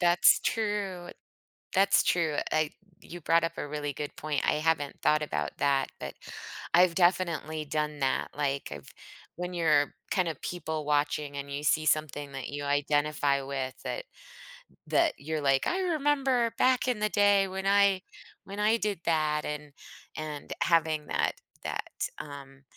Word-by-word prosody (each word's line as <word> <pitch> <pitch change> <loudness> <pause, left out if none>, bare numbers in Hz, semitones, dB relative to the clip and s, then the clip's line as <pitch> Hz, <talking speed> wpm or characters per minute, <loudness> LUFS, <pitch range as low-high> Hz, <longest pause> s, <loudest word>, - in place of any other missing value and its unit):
That's 175 0 +5
true. 200 -5 -2 0.6
That's 195 +1 +5
true, 160 -4 +1
I 155 -1 +1 0.3
you 175 0 -10
brought 165 +2 +3
up 165 - -1
a - - -3
really 145 -1 -3
good 145 +2 -6
point, 150 -1 -1
I - - +4
haven't 150 -2 0
thought 155 0 +4
about 150 - -2
that, 140 -1 +2
but - - -6 0.6
I've 175 -1 +5
definitely 170 -4 +1
done 150 0 -2
that, 135 -1 0
like, 140 -2 -1
I've 75 -2 -8 0.5
when 180 +1 -4
you're, 155 -4 +3 0.2
kind 185 -3 +2
of, 155 -4 -4
people 160 -3 -4
watching, 145 -1 0
and 140 0 -5
you 145 - -3
see 155 +1 +2
something 145 -2 0
that 135 -2 -5
you 145 0 -5
identify 145 0 +1
with 135 -1 -3
that - - -4 0.8
that 330 -2 +3
you're, 155 +2 -3
like, 135 -1 +2
"I 370 - 0
remember 275 -8 +1
back 255 0 +3
in 245 -4 0
the 215 0 +1
day 205 -1 +4
when 190 +1 -3
I 200 -1 +4 0.4
when 200 +1 -7
I 215 +2 +3
did 205 -6 -2
that," 155 -2 +1
and 150 -1 -5 0.4
and 155 -2 -5
having 160 -3 +2
that - - +1 0.3
that, - - -3
um, 140 -2 -9
155 Hz, 160 wpm, -29 LUFS, 145-190 Hz, 0.8 s, That's